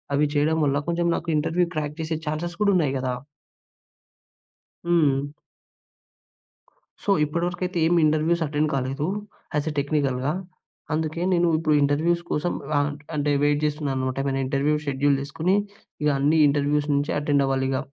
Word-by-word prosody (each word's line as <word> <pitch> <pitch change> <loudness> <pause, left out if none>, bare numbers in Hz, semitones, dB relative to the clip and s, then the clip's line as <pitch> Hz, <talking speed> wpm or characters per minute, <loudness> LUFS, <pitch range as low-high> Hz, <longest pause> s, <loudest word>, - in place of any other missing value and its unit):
అవి 150 +1 +3
చేయడం 155 +2 +2
వల్ల, 140 0 +1
కొంచెం 170 0 0
నాకు 170 - -5
ఇంటర్వ్యూ 165 +4 +1
క్రాక్ 150 0 -3
చేసే 160 0 -2
ఛాన్సెస్ 165 +3 -3
కూడా 200 - +4
ఉన్నాయి 150 -6 +1
కదా! 130 -1 -1 1.7
హ్మ్. 145 -5 +2 1.7
సో, - - -4 0.2
ఇప్పటివరకైతే, 175 +4 -2
ఏమి 175 0 +3
ఇంటర్వ్యూస్ 155 +2 +2
అటెండ్ 150 +1 0
కాలేదు. 135 +2 -2 0.5
యాస్ 150 +1 0
ఎ - - -7
టెక్నికల్‌గా. 140 -1 0 0.6
అందుకే, 160 +1 -2
నేను 175 -1 +3
ఇప్పుడు 155 -1 +2
ఇంటర్వ్యూస్ 165 +5 +1
కోసం 175 +4 0 0.3
ఆహ్, 145 +1 0 0.3
అంటే 145 0 +1
వెయిట్ 145 0 +2
చేస్తున్నానన్నమాట. 135 -4 -2
ఏమైనా 135 -1 0
ఇంటర్వ్యూ 140 +3 +1
షెడ్యూల్ 140 +1 +2
చేసుకొని, 160 +7 0 0.5
ఇక 150 - +3
అన్ని 150 +3 +3
ఇంటర్వ్యూస్ 145 +1 +1
నుంచి 140 +1 0
అటెండ్ 145 -1 +2
అవ్వాలి 135 0 0
ఇక. 130 - 0
150 Hz, 140 wpm, -24 LUFS, 140-165 Hz, 1.7 s, కూడా